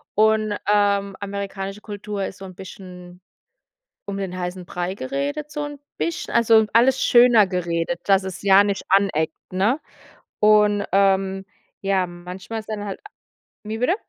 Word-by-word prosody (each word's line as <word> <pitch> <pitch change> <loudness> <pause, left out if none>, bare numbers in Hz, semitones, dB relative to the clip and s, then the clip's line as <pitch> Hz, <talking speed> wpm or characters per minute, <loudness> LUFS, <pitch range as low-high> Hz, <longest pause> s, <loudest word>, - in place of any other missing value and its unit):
Und, 215 0 +3 0.2
ähm, 200 -1 +2
amerikanische 200 0 -5
Kultur 205 -1 -5
ist 190 - -7
so 195 - -9
'n 185 - -10
bisschen 180 -1 -11 0.9
um 200 - -4
den 190 -2 -4
heißen 180 0 -5
Brei 180 +1 -4
geredet, 280 +5 -4
so 295 -1 -3
'n 290 -1 -7 0.2
bisschen 335 - -3
also, 225 -1 +5
alles 250 +4 +4
schöner 240 -4 +6
geredet, 175 -1 -2
dass 195 -1 +4
es 190 0 -6
ja 200 0 +6
nicht 200 -1 -2
aneckt, 185 -5 +2 0.2
ne, 205 +10 +1 0.6
und, 210 -1 +4
ähm, 195 -1 +2 0.4
ja, 195 -1 +1
manchmal 180 +5 -7
ist 215 - -11
ja 215 - -2
dann 205 0 -6
halt 195 - -5
a 420 - -11 0.6
wie 215 +1 -4
bitte? 250 +10 +2
200 Hz, 160 wpm, -22 LUFS, 190-215 Hz, 0.9 s, schöner